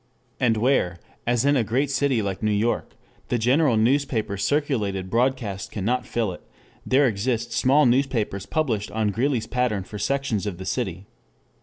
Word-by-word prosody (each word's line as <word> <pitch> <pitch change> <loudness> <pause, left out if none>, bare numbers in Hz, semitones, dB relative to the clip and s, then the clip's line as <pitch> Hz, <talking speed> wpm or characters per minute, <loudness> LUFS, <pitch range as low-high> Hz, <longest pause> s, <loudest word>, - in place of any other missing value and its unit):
And 115 -3 +2
where, 110 -7 +1 0.3
as 120 +1 +2
in 145 0 +4
a 125 - +3
great 130 +6 0
city 135 -5 +1
like 95 -2 -3
New 110 - +1
York, 105 +3 -1 0.3
the 120 - 0
general 125 +2 +3
newspapers 110 -4 +1
circulated 105 -11 -1
broadcast 115 -5 -1
cannot 120 +5 -1
fill 115 -5 -1
it, 90 - -9 0.4
there 135 +2 +3
exist 120 +2 -1
small 140 +5 +4
newspapers 120 -6 +1
published 120 -10 -1
on 110 -1 0
Greeley's 120 +2 0
pattern 125 -6 -1
for 105 +2 -8
sections 115 -3 -1
of 95 -4 -4
the 95 - -7
city. 95 -6 -3
115 Hz, 160 wpm, -24 LUFS, 105-130 Hz, 0.4 s, in